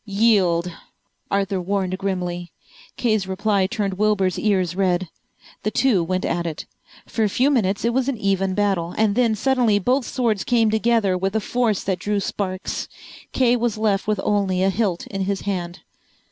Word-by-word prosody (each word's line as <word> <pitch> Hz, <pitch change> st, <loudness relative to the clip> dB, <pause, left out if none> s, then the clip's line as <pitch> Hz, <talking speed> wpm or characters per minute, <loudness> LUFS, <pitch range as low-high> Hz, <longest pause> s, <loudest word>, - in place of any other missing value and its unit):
"Yield," 195 Hz, -5 st, +2 dB, 0.6 s
Arthur 195 Hz, -1 st, 0 dB
warned 190 Hz, 0 st, -1 dB
grimly. 180 Hz, -3 st, -3 dB, 0.5 s
Kay's 215 Hz, -5 st, +1 dB
reply 195 Hz, 0 st, +1 dB
turned 200 Hz, -1 st, -2 dB
Wilbur's 205 Hz, -4 st, +1 dB
ears 185 Hz, -5 st, +1 dB
red. 185 Hz, -1 st, +1 dB, 0.5 s
The 215 Hz, -, -1 dB
two 215 Hz, -5 st, +2 dB
went 185 Hz, +2 st, -1 dB
at 170 Hz, 0 st, -1 dB
it. 160 Hz, -2 st, -5 dB, 0.4 s
For 225 Hz, -, -1 dB
a 210 Hz, -, +2 dB
few 260 Hz, +8 st, +2 dB
minutes 205 Hz, -6 st, +1 dB
it 235 Hz, -, +1 dB
was 265 Hz, +1 st, +1 dB
an 265 Hz, -, -2 dB
even 195 Hz, -2 st, 0 dB
battle, 195 Hz, -5 st, 0 dB
and 215 Hz, -2 st, +3 dB
then 230 Hz, -1 st, +2 dB
suddenly 240 Hz, -2 st, +2 dB
both 250 Hz, +5 st, +1 dB
swords 230 Hz, -7 st, 0 dB
came 230 Hz, -3 st, +2 dB
together 220 Hz, -3 st, +2 dB
with 190 Hz, +3 st, -2 dB
a -, -, +3 dB
force 225 Hz, -1 st, 0 dB
that 190 Hz, -2 st, -1 dB
drew 205 Hz, +1 st, -1 dB
sparks. 185 Hz, -1 st, -3 dB, 0.4 s
Kay 245 Hz, -2 st, +3 dB
was 235 Hz, -2 st, -1 dB
left 210 Hz, -2 st, 0 dB
with 210 Hz, -2 st, 0 dB
only 195 Hz, -3 st, +1 dB
a 195 Hz, -, +3 dB
hilt 190 Hz, -3 st, -1 dB
in 195 Hz, -1 st, -3 dB
his 200 Hz, 0 st, -2 dB
hand. 180 Hz, -2 st, -4 dB
200 Hz, 175 wpm, -22 LUFS, 185-220 Hz, 0.6 s, and